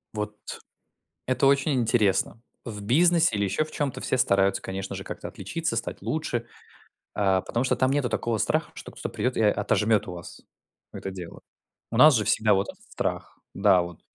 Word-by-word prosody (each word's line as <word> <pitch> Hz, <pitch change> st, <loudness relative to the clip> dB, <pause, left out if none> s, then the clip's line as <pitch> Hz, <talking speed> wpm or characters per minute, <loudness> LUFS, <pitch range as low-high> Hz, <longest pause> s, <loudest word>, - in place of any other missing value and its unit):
Вот, 105 Hz, 0 st, -3 dB, 0.9 s
это 130 Hz, +2 st, +2 dB
очень 140 Hz, +2 st, +3 dB
интересно. 115 Hz, -3 st, +1 dB, 0.2 s
В 105 Hz, -3 st, -5 dB
бизнесе 165 Hz, +3 st, +4 dB
или 100 Hz, -, +1 dB
ещё 100 Hz, +10 st, 0 dB
в 155 Hz, -, -11 dB
чём-то 140 Hz, -4 st, -3 dB
все 130 Hz, -, 0 dB
стараются, 100 Hz, -4 st, +2 dB
конечно 95 Hz, 0 st, -5 dB
же, -, -, -6 dB
как-то -, -, -6 dB
отличиться, 135 Hz, -, -3 dB
стать 115 Hz, -, -4 dB
лучше. 125 Hz, -7 st, -2 dB, 0.7 s
А 95 Hz, -2 st, +2 dB
потому 120 Hz, +6 st, -2 dB
что 130 Hz, -, +1 dB
там 130 Hz, 0 st, +2 dB
нету 140 Hz, -2 st, +1 dB
такого 115 Hz, 0 st, -1 dB
страха, -, -, 0 dB
что -, -, -9 dB
кто-то -, -, -6 dB
придет 125 Hz, 0 st, -2 dB
и -, -, +2 dB
о 105 Hz, -, +5 dB
отожмет 105 Hz, +1 st, +1 dB
у 90 Hz, -, -5 dB
вас 85 Hz, -1 st, -10 dB, 0.5 s
это 95 Hz, -, -6 dB
дело. 90 Hz, -3 st, -9 dB, 0.5 s
У 115 Hz, -, -3 dB
нас 150 Hz, -1 st, +8 dB
же 110 Hz, -, +1 dB
всегда 110 Hz, +1 st, +3 dB
вот 95 Hz, +1 st, 0 dB
этот -, -, -19 dB
страх. -, -, -4 dB, 0.2 s
Да, 95 Hz, -2 st, +4 dB
вот. 85 Hz, -1 st, -9 dB
110 Hz, 185 wpm, -26 LUFS, 100-130 Hz, 0.9 s, нас